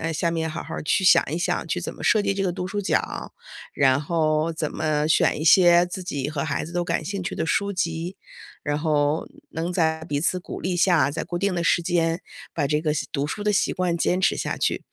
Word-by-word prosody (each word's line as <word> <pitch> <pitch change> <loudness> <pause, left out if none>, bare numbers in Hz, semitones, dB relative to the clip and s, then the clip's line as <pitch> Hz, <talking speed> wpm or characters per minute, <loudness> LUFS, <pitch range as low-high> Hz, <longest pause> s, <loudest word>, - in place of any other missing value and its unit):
哎， 165 0 -2
下 170 +2 0
面 160 -1 -2
好 160 +2 -5
好 - - -6
去 170 +5 +1
想 170 -2 +7
一 165 - -1
想 175 - -1
去 - - -1
怎 - - -5
么 - - -11
设 215 - +4
计 200 -1 0
这 195 - -1
个 190 - +1
读 180 0 -4
书 205 +2 -3
角， 200 - -2 0.4
然 135 -1 +3
后 155 0 +1
怎 155 -1 -3
么 150 -1 0
选 155 - +3
一 155 - -2
些 175 +1 +6
自 180 +1 -6
己 145 -6 -3
和 145 -2 -2
孩 150 - -2
子 170 - -9
都 175 0 0
感 - - -1
兴 195 -1 -4
趣 - - -4
的 - - -2
书 200 +5 0
籍。 170 0 -3 0.5
然 145 0 -1
后 150 0 +1 0.2
能 165 +3 -3
在 160 -2 +1
彼 145 -3 -2
此 180 +2 0
鼓 - - -7
励 180 0 -1
下， 170 -6 +3
在 150 - -3
固 175 - -4
定 200 0 0
的 170 - -1
时 170 - +3
间 165 0 0 0.3
把 145 - 0
这 150 +1 +1
个 155 -1 0
习 - - -2
读 140 0 -1
书 205 +7 -5
的 210 - +2
习 200 - +1
惯 180 -2 0
坚 180 +2 +1
持 - - +2
下 - - -2
去。 - - -1
165 Hz, 265 characters per minute, -24 LUFS, 155-180 Hz, 0.5 s, 想